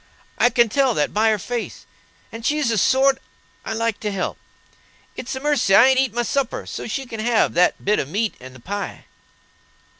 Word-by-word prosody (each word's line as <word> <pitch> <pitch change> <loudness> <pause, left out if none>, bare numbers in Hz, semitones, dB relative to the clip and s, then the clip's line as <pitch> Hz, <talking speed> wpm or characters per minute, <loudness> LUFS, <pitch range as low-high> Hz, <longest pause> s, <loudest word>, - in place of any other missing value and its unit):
I 245 - +5
can 235 -1 +3
tell 260 +1 +1
that 150 - 0
by 220 +2 +3
her 215 - +2
face, 240 +3 -5 0.5
and 225 0 -9
she's 295 0 +1
the 225 -2 +1
sort 265 +5 +3 0.4
I - - -4
like 230 -1 -1
to 210 - -3
help. 195 -2 -3 0.8
It's 255 - -5
a - - -4
mercy 280 -9 +2
I 230 - +8
ain't 260 -1 +3
eat 265 -3 +1
my 240 +2 -1
supper, 270 +1 -2
so - - -6
she 265 +4 -3
can 225 -3 -8
have 230 0 +2
that 180 +1 +2
bit 210 +2 +2
of 140 - -3
meat 210 +5 -1
and 130 0 -12
the - - -13
pie." 200 +10 -6
230 Hz, 205 wpm, -21 LUFS, 210-260 Hz, 0.8 s, I